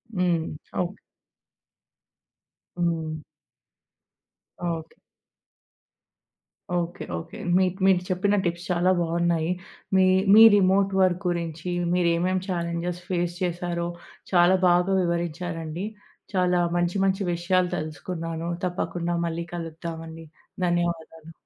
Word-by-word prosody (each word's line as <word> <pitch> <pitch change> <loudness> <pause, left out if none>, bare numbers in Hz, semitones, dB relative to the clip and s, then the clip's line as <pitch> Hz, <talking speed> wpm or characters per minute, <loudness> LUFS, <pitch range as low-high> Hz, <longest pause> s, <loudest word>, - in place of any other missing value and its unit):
హ్మ్. 175 -3 +2 0.4
ఓకె. 180 +3 -3 1.8
హ్మ్. 160 -2 -1 1.5
Okay. 165 -2 -4 1.8
Okay. 175 +2 -2
Okay. 85 - -8 0.2
మీ 190 - +4 0.2
మీరు 190 -2 +5
చెప్పిన 195 +3 +2
టిప్స్ 170 +1 -2
చాలా 180 +1 +3
బాగున్నాయి. 170 0 +1 0.4
మీ 190 0 +6 0.3
మీ 220 - +9
రిమోట్ 195 0 +3
వర్క్ 180 -1 +2
గురించి 170 -1 -3 0.2
మీరేమేం 180 +1 +2
చాలెంజస్ 170 -1 -2
ఫేస్ 175 -1 -1
చేసారో, 175 -1 -2 0.4
చాలా 175 0 +5
బాగా 180 +2 +3
వివరించారండి. 170 0 -3 0.5
చాలా 180 -1 +2 0.2
మంచి, 175 +1 +1
మంచి 195 +1 +1
విషయాలు 180 +1 +1
తెలుసుకున్నాను. 165 +1 -4 0.2
తప్పకుండా 175 -1 -2
మళ్ళీ 170 0 -3
కలుద్దాం 165 0 -6
అండి. 165 0 -10 0.4
ధన్యవాదాలు. 170 -2 -2
175 Hz, 95 wpm, -25 LUFS, 170-180 Hz, 1.8 s, మీ